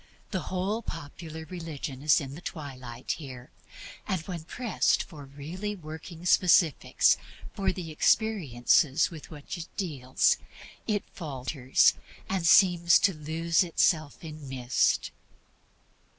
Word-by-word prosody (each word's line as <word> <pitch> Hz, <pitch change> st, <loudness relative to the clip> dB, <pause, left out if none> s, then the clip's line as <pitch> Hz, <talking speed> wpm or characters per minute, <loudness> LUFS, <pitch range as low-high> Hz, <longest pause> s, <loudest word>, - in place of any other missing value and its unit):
The 185 Hz, -7 st, -3 dB
whole 195 Hz, +5 st, -1 dB
popular 160 Hz, -2 st, -8 dB
religion 155 Hz, -6 st, -6 dB
is 150 Hz, +1 st, +5 dB
in 135 Hz, -3 st, -6 dB
the 160 Hz, -, -9 dB
twilight 130 Hz, -7 st, -6 dB
here. 130 Hz, -5 st, -9 dB, 0.6 s
And 190 Hz, -, 0 dB
when 170 Hz, -2 st, -7 dB
pressed 235 Hz, +3 st, +1 dB
for 145 Hz, -3 st, -11 dB
really 165 Hz, +10 st, -6 dB
working 160 Hz, 0 st, -9 dB
specifics 175 Hz, -4 st, +4 dB, 0.4 s
for 195 Hz, -, 0 dB
the 175 Hz, -3 st, -6 dB
experiences 155 Hz, -, +2 dB
with 160 Hz, -3 st, -10 dB
which 150 Hz, +2 st, -7 dB
it 165 Hz, -, -6 dB
deals, 140 Hz, -9 st, +1 dB, 0.5 s
it 205 Hz, -3 st, 0 dB
falters, 135 Hz, -4 st, +2 dB, 0.3 s
and 185 Hz, -3 st, 0 dB
seems 175 Hz, -2 st, +6 dB
to 195 Hz, -, +3 dB
lose 160 Hz, +2 st, +1 dB
itself 165 Hz, -3 st, +1 dB
in 155 Hz, -3 st, -8 dB
mist. 130 Hz, -1 st, +1 dB
160 Hz, 120 wpm, -28 LUFS, 140-180 Hz, 0.6 s, seems